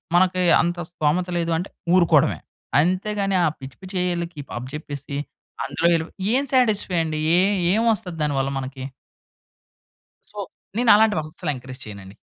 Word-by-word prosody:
మనకి 185 0 +3 0.2
అంత 175 +1 -1
స్తోమత 175 +1 0
లేదు 170 0 -1
అంటే 180 +4 -4 0.3
ఊరుకోడవే. 165 -5 +4 0.4
అంతేగాని 195 +3 0
ఆ! - - +4
పిచ్చి 135 -1 -10
పిచ్చి 185 +1 -9
ఏఐ 180 -1 0
లకి 170 -3 -8 0.2
అప్పజెప్పేసి 140 +2 -6 0.5
అందులో 170 +1 0
ఎళ్లిపోయి, 160 0 -3 0.2
ఏం 270 +2 +3
సాటిస్ఫై 210 -8 +2
అండి? 155 -1 -3 0.2
ఏ - - +6 0.3
ఏం 220 - +2
వస్తది 180 -4 -5
దాని 145 -1 0
వల్ల 135 0 0
మనకి? 130 0 -6 1.5
సో, - - -9 0.4
నేనలాంటివహస్సలెంకరేజ్ 155 - +2
చెయనండి. 100 -2 -10
170 Hz, 130 wpm, -23 LUFS, 145-185 Hz, 1.5 s, ఏ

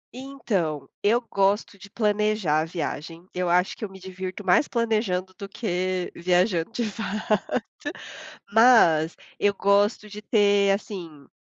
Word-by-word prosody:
Então 220 - -3
eu 225 +4 +3
gosto 200 -3 0
de 200 +1 -13
planejar 210 -6 +1
a - - -2
viagem. 165 0 -5
Eu 180 -1 -1
acho 180 +2 +2
que - - -10
eu 210 - -3
me 190 0 -13
divirto 185 +1 -7
mais 185 +10 +4
planejando 215 -6 -1
do 200 0 -8
que 185 -4 -2
viajando 180 +1 +1
de 235 +1 -2
fato. 215 0 -3 1.2
Mas 190 -9 +5 0.2
eu 205 0 +2
gosto 200 +2 +2
de 210 +1 -9
ter 205 -3 +3
assim 170 -8 -5
200 Hz, 135 wpm, -25 LUFS, 180-215 Hz, 1.2 s, Mas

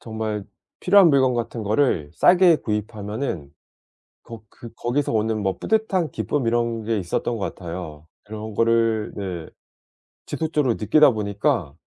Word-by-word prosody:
정말 110 -2 -4 0.4
필요한 195 -1 +6
물건 130 -2 +3
같은 115 -1 -3
거를 105 - +1
싸게 175 -2 +5
구입하면은 105 - -4 0.7
걷 115 -2 -11
그 120 - -12
거기서 130 +4 -1
오는 110 0 0
뭐 95 -1 -1
뿌듯한 205 -7 0
기쁨 135 0 -2
이런 115 -1 0
게 110 0 0
있었던 100 +5 -2
것 100 - -4
같아요. 85 -4 -8 0.2
그런 110 0 -7
거를 115 -1 +1
네 90 -5 -5 0.8
지속적으로 150 -6 0
느끼다 145 +8 +4
보니까 105 - -1
115 Hz, 290 characters per minute, -22 LUFS, 105-135 Hz, 0.8 s, 필요한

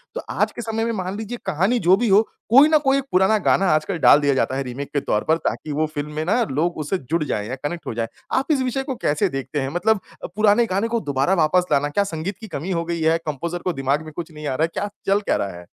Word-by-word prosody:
तो - - -3
आज - - 0
के - - -7
समय 225 -1 -2
में 230 - 0
मान 190 -1 -4
लीजिए 220 +3 -5
कहानी 195 +7 +1
जो 180 0 +5
भी 240 +2 0
हो 200 +2 +6 0.3
कोई 270 +6 +8
ना 310 - +5
कोई 275 +1 +4
पुराना 190 +4 +4
गाना 195 - +3
आजकल 155 +4 -1
डाल 145 - +7
दिया 145 -1 +2
जाता 130 - 0
है 135 - -1
रीमेक 135 +2 -6
के 145 - +2
तौर 105 - 0
पर 160 - +4
ताकि 155 - -3
वो 155 +2 0
फ़िल्म 145 +1 -4
में 155 - -1
ना 205 +8 +2
लोग 165 +6 0
उससे 155 +5 -1
जुड़ 160 +1 -2
जाएँ 105 -7 -3
या 130 - -3
कनेक्ट 170 +4 -4
हो - - -3
जाएँ। 115 0 -2 0.3
आप 270 +4 0
इस 280 -3 +2
विषय 260 +1 -1
को 265 -1 -4
कैसे 145 0 +2
देखते 135 +2 -4
हैं, 135 - -2
मतलब 200 +7 +1 0.2
अ, - - -3
पुराने 215 +2 +4
गाने 200 +2 -1
को 230 0 0
दोबारा 135 +7 +1
वापस 180 +4 +2
लाना, 145 +1 +2
क्या 200 +7 +1
संगीत 180 +1 -4
की 220 - -9
कमी 180 0 -5
हो 170 -2 -1
गई 170 0 -3
है, 160 +1 +3
कम्पोज़र 165 +4 -3
को 180 - 0
दिमाग 135 +2 0
में 155 - -9
कुछ 170 -1 -6
नहीं 150 -1 -7
आ 130 - -1
रहा 155 - +1
है, 165 - +1
क्या 205 - -2 0.2
चल 195 +1 +3
क्या - - +4
रहा 95 -3 -4
है? 90 - -13
170 Hz, 280 wpm, -22 LUFS, 145-210 Hz, 0.3 s, कोई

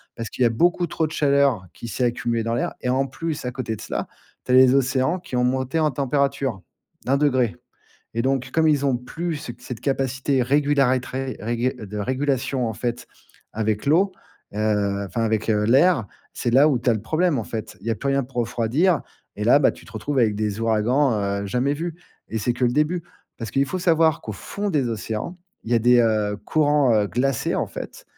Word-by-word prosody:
Parce 115 -1 -5
qu'il 130 - -1
y - - +6
a - - +5
beaucoup 175 +8 +2
trop 160 -1 -1
de - - -11
chaleur 140 -9 +2
qui 115 - -9
s'est 125 - -2
accumulée 120 -1 -1
dans 115 +1 -1
l'air. - - -1
Et 125 - -1
en 130 +2 +2
plus 150 0 -4
à 125 - -2
côté 125 -3 -4
de - - -11
cela, - - -4 0.4
tu - - -2
as - - +5
les 130 0 +7
océans 135 +5 +1
qui 175 -8 -7
ont 125 - +2
monté 130 +4 0
en 155 -1 +2
température, 135 -5 -1 0.4
de 130 - -1
1°. 130 - +2 0.6
Et 115 - 0
donc 130 -1 0
comme 160 -1 +3
ils 145 -2 +2
ont 130 -2 +2
plus 165 +6 -4
ce 125 - -7
cette 125 -2 -8
capacité 135 -1 0
régulatrice 135 -2 +1
régu 120 +4 -1
de 105 0 -7
régulation 130 +1 -1
en 110 - -4
fait 120 +1 -3 0.5
avec 110 +1 -1
l'eau. 185 +6 +3 0.4
Heu, 105 -2 0
enfin 105 +5 -3
avec, 110 0 0
heu, 105 -1 +2
l'air. 135 - +4 0.3
C'est 120 - -1
là 140 +5 +6
où 135 -5 +2
tu 120 +1 +1
as - - +3
le 110 - -3
problème, 155 +4 +1
en 115 - -3
fait. 110 0 -6
Il 105 - -13
y - - +1
a - - +1
plus 140 +5 -4
rien 135 0 +2
pour 130 0 -17
refroidir 125 +9 +1 0.4
et - - -3
là, - - +6
bah, - - +3
tu - - -16
te - - -15
retrouves 145 -2 -2
avec 110 -4 +3
des 105 0 -2
ouragans, 115 +5 +2 0.3
heu, 100 - -4
jamais 125 +7 0
vus 165 +2 -4 0.3
et 110 - -5
c'est 115 +4 0
que 125 - 0
le 120 - +2
début. 150 +5 +1 0.4
Parce 115 -3 -5
qu'il 135 - +2
faut 185 - -3
savoir 165 -3 +3
qu'au 110 - -5
fond 205 - -5
des 140 -7 +1
océans, 110 - -4 0.3
il 120 - -3
y - - +5
a - - +5
des, 120 +1 +5
heu, 110 -3 +1
courants, 145 -3 +3
heu, 105 -1 +2
glacés, 130 0 0
en - - 0
fait. - - -8
130 Hz, 220 wpm, -23 LUFS, 115-145 Hz, 0.6 s, les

